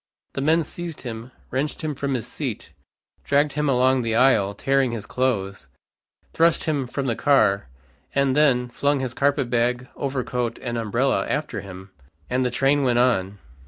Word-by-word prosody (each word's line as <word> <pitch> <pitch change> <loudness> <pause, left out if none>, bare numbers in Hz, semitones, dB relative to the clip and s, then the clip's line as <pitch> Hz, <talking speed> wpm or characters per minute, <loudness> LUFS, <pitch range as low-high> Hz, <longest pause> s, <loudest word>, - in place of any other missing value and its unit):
The 135 - -3
men 160 +4 +3
seized 170 +1 -7
him, 115 0 -7 0.2
wrenched 140 +5 -2
him 155 -1 -1
from 140 0 -2
his 120 - -3
seat, - - -5 0.5
dragged 145 +1 +2
him 150 -1 0
along 130 0 +3
the 115 -1 -1
aisle, 110 -6 +3
tearing 135 -3 +1
his 110 -3 -5
clothes, 100 - -2 0.7
thrust 165 0 +3
him 145 -5 -1
from 135 +2 -3
the 120 -3 0
car, 105 - +3 0.5
and, 140 -1 +2
then 135 -5 +3
flung 140 +3 0
his 130 -2 -3
carpet 140 -2 +1
bag, 125 +1 0
overcoat 125 -3 -2
and 120 -2 -4
umbrella 115 +4 0
after 150 +1 -2
him. 95 0 -11 0.4
And 130 +1 +1
the 125 - +1
train 135 +3 +2
went 125 -3 +2
on. 105 -6 +2
130 Hz, 165 wpm, -23 LUFS, 120-140 Hz, 0.7 s, men